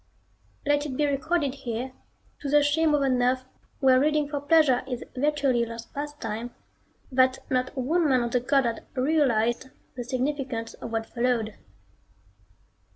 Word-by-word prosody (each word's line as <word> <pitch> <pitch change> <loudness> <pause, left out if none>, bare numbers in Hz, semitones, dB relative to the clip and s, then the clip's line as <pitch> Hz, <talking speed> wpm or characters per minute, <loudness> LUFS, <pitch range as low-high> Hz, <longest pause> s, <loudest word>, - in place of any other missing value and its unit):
Let 290 +1 +2
it 260 -3 -5
be 300 - +2
recorded 285 0 0
here, 255 -2 -4 0.5
to 285 - -4
the 295 +1 +5
shame 305 +1 +3
of 285 - +1
an 255 -2 +2
Earth 255 +1 +1 0.4
where 260 -1 +6
reading 300 +1 +2
for 285 -1 -3
pleasure 290 -4 +4
is 250 -3 -4
virtually 275 -3 +2
a - - -3
lost 230 0 -9
pastime, 245 -6 -5 0.6
that 260 0 +4
not 255 +1 0
one 310 +5 +2
man 255 -2 +3
on 235 - -3
the 250 - +2
Goddard 250 -2 +1
realized 255 -4 +1 0.3
the 245 - -4
significance 255 -2 -2
of - - -8
what 225 0 -1
followed. 235 -3 -1
260 Hz, 155 wpm, -26 LUFS, 245-290 Hz, 0.6 s, where